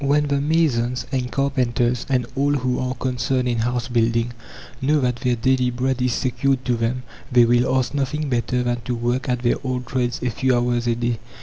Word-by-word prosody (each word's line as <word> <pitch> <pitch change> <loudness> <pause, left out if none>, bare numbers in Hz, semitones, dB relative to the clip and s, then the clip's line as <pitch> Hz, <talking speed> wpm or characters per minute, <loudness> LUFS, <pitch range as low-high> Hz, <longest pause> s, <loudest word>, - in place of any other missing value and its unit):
When 145 +1 +2
the 140 -1 +1
masons, 135 -6 +1
and 125 -2 -1
carpenters, 125 -3 0
and 125 -3 +1
all 140 +1 +2
who 130 -2 0
are 130 0 -2
concerned 125 0 -1
in 120 -2 0
house 120 +1 -1
building, 115 0 +1 0.5
know 150 +3 +3
that 125 -2 0
their 125 0 0
daily 125 +2 +2
bread 130 +1 -1
is 125 -1 +1
secured 130 +1 0
to 125 - +1
them, 115 +2 -1 0.3
they 120 -1 +6
will 120 +2 +3
ask 130 +1 -1
nothing 145 +2 -1
better 125 -1 0
than 120 -1 -1
to 125 - -1
work 120 +3 -1
at 125 0 -1
their 120 - +2
old 130 -1 -2
trades 125 -1 -1
a 125 - 0
few 130 +2 +1
hours 120 0 0
a 120 - +2
day. 120 -1 -1
125 Hz, 205 wpm, -22 LUFS, 120-130 Hz, 0.5 s, they